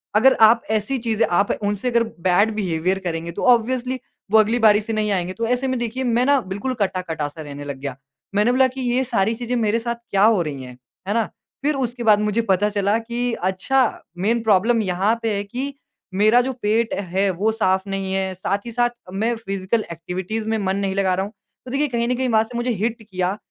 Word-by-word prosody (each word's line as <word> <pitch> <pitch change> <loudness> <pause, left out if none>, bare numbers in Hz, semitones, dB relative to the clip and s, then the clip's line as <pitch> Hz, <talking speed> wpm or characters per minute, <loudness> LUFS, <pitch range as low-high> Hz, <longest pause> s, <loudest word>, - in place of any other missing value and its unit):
अगर 260 +5 +6
आप 225 +1 +7
ऐसी 220 +5 0
चीज़ें 225 -1 +1
आप 200 +3 +2
उनसे 205 +4 -1
अगर 235 -1 +3 0.2
बैड 200 +5 +4
बिहेवियर 185 -2 0
करेंगे 170 -2 -4
तो - - -5
ऑब्वियसली 255 +2 -2 0.3
वो 220 - +7
अगली 220 +2 +3
बारी 215 -2 +5
से 225 +2 -4
नहीं 215 -1 0
आएँगे। 185 -2 -1
तो 230 +4 -3
ऐसे 250 +2 0
में 260 0 0
देखिए 240 +2 -3
मैं 245 0 +2
ना 285 0 +4
बिल्कुल 200 +6 -4
कटा-कटा 180 -6 -1
सा 150 +2 -10
रहने 145 -1 -8
लग 140 -1 -5
गया। 135 -2 -5 0.4
मैंने 210 +4 +3
बोला 260 +1 +4
कि 260 +1 -7
ये 250 +1 +1
सारी 220 -3 +1
चीजें 245 +1 -3
मेरे 225 -1 +1
साथ 235 +1 -2
क्या 195 0 +3
हो 215 -3 +5
रही 145 -5 -4
हैं। 125 -1 -11 0.3
है 205 - 0
ना? 230 0 +2 0.4
फिर 300 +1 +1
उस 265 -2 0
उसके 240 0 -7
बाद 215 -2 +5
मुझे 210 +2 +1
पता 205 -1 +2
चला 205 +1 +1
कि 240 +1 -2
अच्छा 190 +8 +1 0.4
मेन 225 +6 +1
प्रॉब्लम 220 +2 +3
यहाँ 195 +3 +1
पे 225 -2 0
है 200 - -2
कि 255 +7 -4 0.4
मेरा 215 +5 +5
जो 260 +2 -2
पेट 220 +2 +1 0.2
है 195 +2 +2
वो 200 +5 0
साफ 190 -3 0
नहीं 195 -1 -3
है। 190 -1 -1
साथ 200 +3 -2
ही 235 - -6
साथ 240 +1 +2 0.2
मैं 225 +5 0
फिज़िकल 195 0 -2
एक्टिविटीज़ 185 +6 -4
में 225 - +1
मन 195 -2 -1
नहीं 195 -1 -1
लगा 195 -2 +2
रहा 190 +1 -1
हूँ। 205 - -9 0.3
तो 250 - -8
देखिए 285 +3 +1
कहीं 235 -3 -1
न 250 - +1
कहीं 260 0 -1
वहाँ 220 -1 +4
से 235 +2 -7
मुझे 240 +1 0
हिट 225 +2 -2
किया 185 -2 -2
215 Hz, 225 wpm, -21 LUFS, 190-235 Hz, 0.4 s, आप